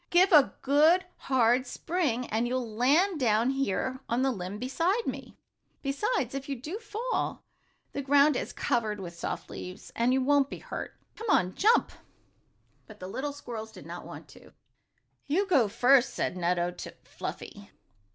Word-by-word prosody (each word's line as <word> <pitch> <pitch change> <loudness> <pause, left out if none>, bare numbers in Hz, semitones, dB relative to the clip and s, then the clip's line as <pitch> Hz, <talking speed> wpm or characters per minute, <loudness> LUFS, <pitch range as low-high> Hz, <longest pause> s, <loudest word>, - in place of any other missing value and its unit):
Give 365 +3 +5
a 300 -5 +6
good, 310 +7 +4
hard 255 0 +2
spring, 275 -5 -1
and 225 +3 0
you'll 250 -1 -2
land 305 - +3
down 230 0 +2
here 260 0 -1
on 240 +3 +1
the 270 - +2
limb 190 -2 -5
beside 335 - 0
me. - - -6 0.5
Besides, 275 - -1
if 275 0 -5
you 275 - -1
do 300 - -6
fall, 455 +2 -3 0.5
the 280 - -3
ground 280 +1 +4
is - - -3
covered 215 -3 -1
with 175 -3 -7
soft - - -4
leaves, 180 +1 -8
and 235 +2 +2
you 260 - +3
won't 280 0 +3
be - - -6
hurt. - - -7 0.2
Come 450 -1 -6
on. 185 - +3
Jump!" 445 +4 +3 1.0
But 215 -1 -13
the 185 - -7
little 270 +9 -3
squirrels 235 -6 -7
did - - -12
not - - -7
want - - -10
to. - - -16 0.7
"You 350 +8 +2
go 275 - +3
first," 250 +5 +4
said - - -1
Nutto 175 0 0
to - - -8
Fluffy. - - -8
265 Hz, 165 wpm, -29 LUFS, 230-305 Hz, 1.0 s, a